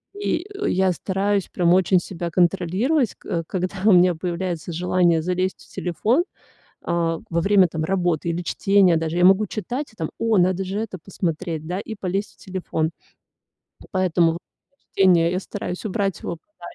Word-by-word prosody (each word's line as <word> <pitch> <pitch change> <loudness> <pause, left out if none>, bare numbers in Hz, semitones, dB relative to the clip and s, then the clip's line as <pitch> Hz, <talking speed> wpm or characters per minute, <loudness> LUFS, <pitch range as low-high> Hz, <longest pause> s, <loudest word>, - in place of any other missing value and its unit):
и 390 -4 -2 0.2
я 190 0 +2
стараюсь 195 +2 -1
прям 175 -1 +2
очень 185 0 +4
себя 175 -1 -5
контролировать, 190 - +1
ко 165 -1 -4
когда 185 +2 -3
у 215 - +7
меня 180 -1 +5
появляется 175 0 -3
желание 175 -1 +2
залезть 185 +2 -1
в - - -20
телефон. 220 - +1 0.6
А, 170 -1 0
во 170 0 +1
время 195 -1 +5
там 160 -1 -4
работы 175 -2 0
или 170 +1 -2
чтения 195 -1 +3
даже 165 +1 -2
я 180 - +5
могу 195 +3 +5
читать 240 +7 -4
и - - -23
там: 160 -5 -3
о, 225 -2 +2
надо 185 +1 +2
же 195 +3 -3
это 215 -4 -4
посмотреть, 165 -3 -3
да, 180 +2 -2
и 220 +1 -6
полезть 195 +1 -3
в - - -42
телефон. 170 -4 -3 1.0
Поэтому 175 -3 +2
во - - -4
время 280 +9 -29 0.2
чтения 175 -3 +4
я 180 - 0
стараюсь 180 0 -6
убрать 195 -2 -1
его 170 - -4
подальше. 310 - -44
185 Hz, 170 wpm, -22 LUFS, 170-195 Hz, 1.0 s, у